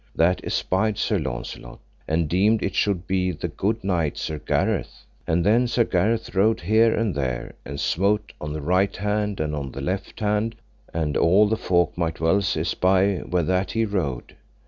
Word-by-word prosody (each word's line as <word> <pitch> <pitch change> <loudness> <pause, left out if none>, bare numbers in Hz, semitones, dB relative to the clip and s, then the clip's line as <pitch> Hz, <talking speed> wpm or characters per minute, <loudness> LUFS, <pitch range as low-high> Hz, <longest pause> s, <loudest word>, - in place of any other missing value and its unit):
That 90 +3 +2
espied 100 +2 0
Sir - - 0
Launcelot, - - -6 0.3
and 80 0 +1
deemed 100 +6 +2
it 95 - -1
should 95 -3 0
be 95 -1 0
the 75 - -4
good 110 +3 -2
knight 85 -6 0
Sir 75 -1 -4
Gareth: - - -1 0.2
and 85 +1 +1
then 115 +4 +4
Sir 120 0 +2
Gareth 110 +4 0
rode 105 +4 +2
here 110 +5 +4
and 110 -4 0
there, 65 -4 -3
and 70 +1 -6
smote 100 +4 0
on 75 - -4
the 75 0 -4
right 90 +6 +1
hand 105 0 -1
and 75 -1 -1
on 70 -3 -5
the 70 - -6
left 95 +7 -4
hand, 105 +1 0 0.4
and 80 -3 -2
all 95 +6 +5
the 110 - +1
folk 85 -5 +1
might 80 -1 -1
well 80 +6 +3
espy 95 +2 +1
where 90 -1 -1
that 95 +3 0
he 115 0 +1
rode. 85 - -3
95 Hz, 180 wpm, -24 LUFS, 80-105 Hz, 0.4 s, all